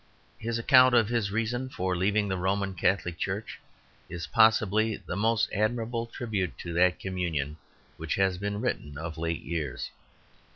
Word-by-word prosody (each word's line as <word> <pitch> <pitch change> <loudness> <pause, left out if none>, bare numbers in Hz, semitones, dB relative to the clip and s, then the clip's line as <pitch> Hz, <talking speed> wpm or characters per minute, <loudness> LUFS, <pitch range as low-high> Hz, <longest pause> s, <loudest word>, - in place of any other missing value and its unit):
His 115 +1 -2
account 130 +1 +6
of 115 -3 +4
his 115 -4 0
reason 120 +4 -1
for 95 -6 -2
leaving 100 +3 +1
the 95 - -1
Roman 95 +2 -1
Catholic 90 -1 0
Church 100 +3 -3 0.5
is 85 0 -5
possibly 110 -1 +3
the - - -6
most 115 +2 +2
admirable 115 +2 -1
tribute 110 -7 -3
to 85 - -6
that 90 +1 +3
communion 80 -6 -2 0.4
which - - -2
has 95 -2 +1
been 100 +1 -2
written 75 - -3
of 80 +1 -6
late 85 0 -2
years. 80 -6 -4
100 Hz, 155 wpm, -28 LUFS, 90-115 Hz, 0.5 s, account